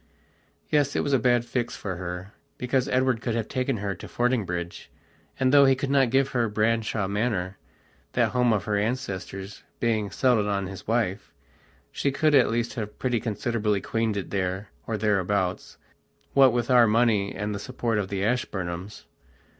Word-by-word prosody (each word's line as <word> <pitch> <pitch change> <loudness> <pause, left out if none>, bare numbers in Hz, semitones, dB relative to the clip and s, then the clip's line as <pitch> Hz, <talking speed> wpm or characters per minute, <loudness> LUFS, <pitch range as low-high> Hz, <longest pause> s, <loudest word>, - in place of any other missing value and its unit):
Yes, 145 -2 +2
it - - +2
was 140 - -1
a 135 - +4
bad 120 0 +2
fix 120 -1 -2
for 95 -3 -5
her, 90 +3 -6 0.2
because 125 +1 0
Edward 130 -3 +1
could 115 -1 -2
have 115 -2 -1
taken 130 -2 -1
her 100 -1 -2
to - - -10
Fordingbridge, 95 -9 -2 0.5
and, 130 +1 +2
though 140 -1 +8
he 135 0 +5
could 135 +1 -3
not 135 -3 +4
give 135 +2 +2
her 120 -4 0
Branshaw 110 -1 0
Manor, 100 -3 -1 0.5
that 120 -2 +2
home 125 0 +3
of 105 -3 +1
her 105 0 -1
ancestors 100 -3 -4 0.2
being 110 -3 0
settled 115 -1 +2
on 100 -1 -1
his 95 -2 -9
wife, 110 -3 -1 0.6
she 140 - 0
could 155 +2 +2
at 135 -3 +5
least 115 0 -1
have 105 -4 -5
pretty 125 -3 0
considerably 105 -1 -1
queened 115 +1 -1
it 100 - -5
there 95 +1 -2 0.2
or 110 - -1
thereabouts, 100 -3 0 0.6
what 135 -2 +6
with 120 +1 -1
our 120 -2 +7
money 110 -3 +2
and 105 +2 -3
the 100 - -4
support 115 -1 -2
of 100 - -2
the 95 0 -2
Ashburnhams. 95 -5 -3
110 Hz, 175 wpm, -26 LUFS, 100-125 Hz, 0.6 s, though